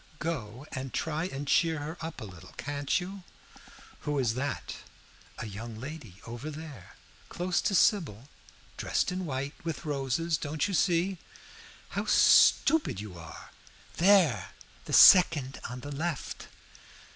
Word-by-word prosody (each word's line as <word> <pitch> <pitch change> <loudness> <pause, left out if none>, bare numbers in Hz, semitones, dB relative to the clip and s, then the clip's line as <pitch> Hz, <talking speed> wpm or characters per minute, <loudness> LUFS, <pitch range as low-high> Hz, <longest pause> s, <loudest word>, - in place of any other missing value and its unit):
Go 130 -6 -4
and 130 -2 -5
try 160 +1 -1
and 145 -5 -5
cheer 165 +2 +3
her 150 +3 -5
up 165 0 -6
a - - -5
little, 90 -5 -13
can't 145 0 -1
you?" 190 +2 -7 0.8
"Who 145 -1 -2
is 125 -5 +1
that?" 140 +3 -4 0.6
"A - - -5
young 110 +2 -7
lady 130 - -9
over 120 +6 -6
there 150 - -10 0.3
close 175 0 -1
to 200 - 0
Sybil 150 - +2 0.5
dressed - - 0
in 185 -1 -3
white 140 +1 -3
with 165 0 -5
roses. 150 +3 -1
Don't 150 +3 -2
you 200 - -4
see? 180 +2 +1 0.7
How - - -3
stupid 315 - +5
you 105 -3 -8
are! 85 -1 -11 0.5
There 180 - +4 0.4
the - - -6
second 150 -8 +7
on 125 +1 -7
the 145 - -7
left." 155 +1 -4
145 Hz, 140 wpm, -29 LUFS, 125-170 Hz, 0.8 s, second